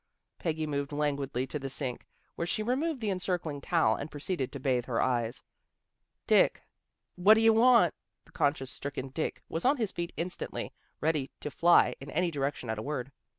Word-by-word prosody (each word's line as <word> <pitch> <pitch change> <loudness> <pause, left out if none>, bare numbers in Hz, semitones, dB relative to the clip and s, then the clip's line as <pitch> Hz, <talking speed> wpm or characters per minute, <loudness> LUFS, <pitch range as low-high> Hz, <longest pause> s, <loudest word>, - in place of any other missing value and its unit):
Peggy 160 -2 -1
moved 140 -1 -2
languidly 140 -3 -1
to 150 +3 -4
the 135 0 -5
sink, 130 -2 -2 0.3
where 170 - -3
she 215 - 0
removed 265 +4 -1
the 210 -2 0
encircling 180 -6 -2
towel 110 -4 +2
and 145 - -6
proceeded 145 -2 -3
to 140 - -6
bathe 125 -2 +1
her 120 -3 -1
eyes. 120 -2 0 0.4
" - - -54
Dick." - - +4 0.3
" - - -56
What 200 +5 +7
d'ye 225 0 +5
want? 235 +2 +5 0.2
" - - -55
The - - -21
conscience 140 -4 0
stricken 135 -1 -5
Dick 145 +4 -3
was 165 - -3
on 280 +3 +4
his 220 -5 0
feet 170 0 -4
instantly, 175 +2 -4 0.3
ready 150 -4 0
to 150 - -4
fly 170 +4 +5
in 135 - -8
any 180 +3 0
direction 140 -3 -2
at 110 -1 -2
a - - -3
word. 135 0 -4
150 Hz, 195 wpm, -30 LUFS, 135-180 Hz, 0.4 s, What